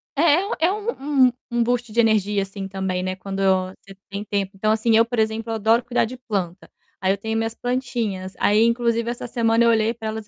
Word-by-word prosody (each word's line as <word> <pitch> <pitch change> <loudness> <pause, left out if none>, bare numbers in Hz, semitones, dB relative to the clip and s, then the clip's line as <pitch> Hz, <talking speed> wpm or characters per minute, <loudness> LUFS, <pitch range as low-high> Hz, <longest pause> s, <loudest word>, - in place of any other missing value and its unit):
é 335 +3 +2
é 365 - +3
um 300 - +1
um - - 0 0.2
um 240 0 +2
boost 240 -1 -1
de 235 - -1
energia 210 -3 +2
assim, 195 0 -7
também, 190 -1 -3
né, 185 0 -2
quando 195 +1 -6
eu 185 -1 +2
você 195 -1 -13
tem 200 +1 -5
tempo. 200 -2 -2
Então 215 +3 +1
assim 220 +1 +2
eu 230 - +5
por 235 -1 -3
exemplo 220 +1 -1
eu - - -1
adoro 225 +2 +2
cuidar 240 -1 +1
de 250 +3 -8
planta, 195 -7 -4 0.3
aí 190 - +2
eu - - -4
tenho 220 +2 -3
minhas 225 0 -1
plantinhas, 235 -7 -3
aí, 210 +2 +4
inclusive, 235 0 +1
essa 240 0 -5
semana 230 -1 +2
eu 235 - +5
olhei 225 0 +2
para 220 -1 -7
elas 220 -1 -5
225 Hz, 230 wpm, -22 LUFS, 200-240 Hz, 0.3 s, eu